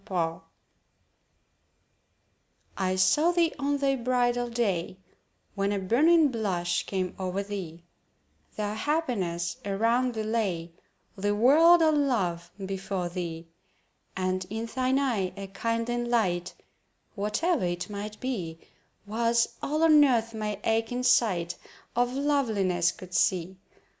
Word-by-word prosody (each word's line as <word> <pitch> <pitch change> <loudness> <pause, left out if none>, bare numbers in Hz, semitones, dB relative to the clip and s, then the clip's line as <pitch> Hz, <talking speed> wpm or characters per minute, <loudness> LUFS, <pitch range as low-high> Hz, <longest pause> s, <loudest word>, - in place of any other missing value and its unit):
SONG 165 -3 -1 2.3
I 185 -1 0
saw 185 - +4
thee 340 -2 +2
on 285 +1 0
thy 275 -1 +1
bridal 245 0 0
day— 195 -7 -1 0.6
When 200 0 -1
a 205 - 0
burning 295 - +4
blush 185 -7 -1
came 185 -2 -2
o'er 190 +1 -2
thee, 180 -5 -7 0.7
Though 210 -1 -2
happiness 205 - -1
around 230 +5 +1
thee 220 - -2
lay, 200 -7 -2 0.4
The 205 +1 0
world 325 +9 +6
all 315 - +5
love 195 - 0 0.2
before 190 -2 -3
thee: 170 -2 -5 0.7
And 185 0 -1
in 220 +2 -3
thine 260 +2 0
eye 225 -10 0
a 195 - -5
kindling 230 +4 -2
light 180 -7 0 0.6
(Whatever 210 - 0
it 175 0 -3
might 210 +1 -6
be) 185 -11 -4 0.5
Was 230 +2 +1
all 305 +3 0
on 305 -2 +7
Earth 230 -4 +2
my 215 -1 -3
aching 225 +3 0
sight 175 -9 +2 0.4
Of 245 +1 +2
Loveliness 220 -11 +1
could 185 -1 -12
see. 185 0 +1
215 Hz, 120 wpm, -27 LUFS, 185-250 Hz, 2.3 s, on